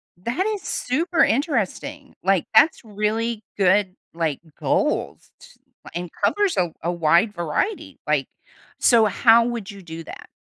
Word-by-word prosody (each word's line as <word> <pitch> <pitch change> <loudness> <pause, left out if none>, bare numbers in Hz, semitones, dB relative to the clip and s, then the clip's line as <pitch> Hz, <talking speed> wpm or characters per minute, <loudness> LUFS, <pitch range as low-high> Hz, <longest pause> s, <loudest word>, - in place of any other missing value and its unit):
That 235 - -2
is 400 - -8
super 325 +6 0
interesting. 280 - -1
Like, 190 -2 +2
that's 310 +7 +5
really 220 +1 -2
good, 190 -1 +3 0.2
like, 165 -4 -1 0.2
goals - - -1
ts - - -17 0.4
and 175 0 -4
covers 410 -3 +2
a 175 -2 +1
a 170 - 0
wide 170 +5 +2
variety, 175 - -3
like, - - +1 0.5
so 230 -3 +5
how 230 +2 +5
would 230 -4 -4
you 200 -1 -12
do 165 -2 -8
that? - - -11
215 Hz, 140 wpm, -22 LUFS, 180-255 Hz, 0.5 s, that's